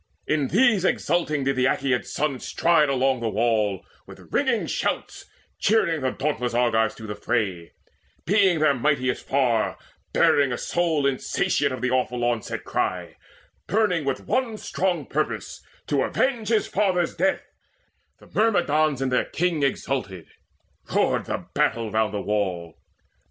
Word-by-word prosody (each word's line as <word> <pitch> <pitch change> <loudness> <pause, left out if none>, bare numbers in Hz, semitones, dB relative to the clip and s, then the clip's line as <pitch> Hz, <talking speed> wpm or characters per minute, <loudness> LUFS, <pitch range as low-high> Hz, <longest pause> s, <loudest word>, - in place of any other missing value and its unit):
In 150 -3 0
these 220 - +3
exulting 160 -5 0
did 135 0 0
the 130 0 +2
Aeacid's 130 -2 0
son 145 -3 -1
Stride 165 0 +2
all 135 - +1
along 130 0 +1
the 115 -1 -1
wall, 110 -3 0 0.2
with - - -14
ringing - - +1
shouts - - -3 0.3
Cheering 170 -8 +2
the 130 - +1
dauntless 130 -3 -2
Argives 110 -3 +2
to 110 - -10
the 105 - -4
fray, 100 -5 -2 0.5
Being 195 -2 +3
their 155 -2 +3
mightiest 135 -1 0
far, 125 -5 +1 0.3
bearing 140 -2 +3
a 120 - -2
soul 165 -5 0
Insatiate 135 -2 0
of 130 - -5
the 125 0 0
awful 125 -1 0
onset 120 -2 -2
cry, - - -2 0.5
Burning 205 -7 +1
with 135 -2 -2
one 245 -4 -1
strong 180 -7 -2
purpose, 150 +4 -3 0.2
to - - 0
avenge 245 -5 0
His 225 -2 +2
father's 185 -4 0
death: 285 0 0 0.7
the - - -18
Myrmidons 155 - +1
in 135 - 0
their 125 - +1
king 175 -2 -1
Exulted. 130 - -2 0.7
Roared - - +2
the - - -4
battle 115 -2 0
round 110 0 +1
the 100 -1 -3
wall. 95 -6 -2
135 Hz, 145 wpm, -24 LUFS, 120-170 Hz, 0.7 s, these